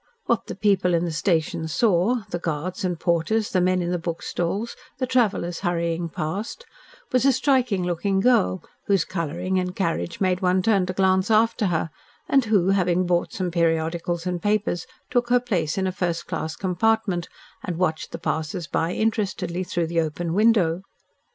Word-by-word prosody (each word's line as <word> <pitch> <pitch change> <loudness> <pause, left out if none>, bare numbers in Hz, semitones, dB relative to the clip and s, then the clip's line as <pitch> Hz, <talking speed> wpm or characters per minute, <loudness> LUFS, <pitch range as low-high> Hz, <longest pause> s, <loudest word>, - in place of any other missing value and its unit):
What 235 - 0
the - - -5
people 195 -3 +2
in 170 +1 +1
the 170 - -2
station 160 -1 0
saw, 210 +6 +2
the 175 - -2
guards 175 +5 -3
and 180 -3 -1
porters, 175 +6 +1
the 185 - +2
men 185 0 +2
in 175 - -2
the 180 - 0
book 165 0 -4
stalls, 200 +7 -2 0.2
the 260 - 0
travellers 220 -9 +1
hurrying 170 -2 -1
past, 195 - -4 0.5
was 255 - +3
a 275 - +6
striking 255 -7 +2
looking 180 +3 0
girl, 215 -4 +3 0.2
whose 195 -4 +3
colouring 175 +4 -2
and 180 0 -3
carriage 170 -2 -2
made 185 -2 +1
one 185 0 +2
turn 195 -4 +3
to 185 - -2
glance 190 +1 +2
after 225 0 +3
her, 165 -2 -1 0.4
and 270 -3 +3
who, 200 -4 +3
having 185 -2 +2
bought 175 -1 +1
some 185 -2 -2
periodicals 165 +1 0
and 180 -1 -2
papers, 205 -4 0 0.2
took 245 -1 +1
her 245 0 +5
place 185 -11 -1
in 190 - +1
a 185 - 0
first 175 -2 -2
class 155 0 -4
compartment 190 -1 0 0.3
and 175 - -3
watched 160 -3 -1
the - - -4
passersby 165 +1 -2
interestedly 195 -5 -1
through 175 -1 -1
the 165 0 +1
open 165 +2 -3
window. 195 -5 +3
180 Hz, 175 wpm, -24 LUFS, 170-205 Hz, 0.5 s, a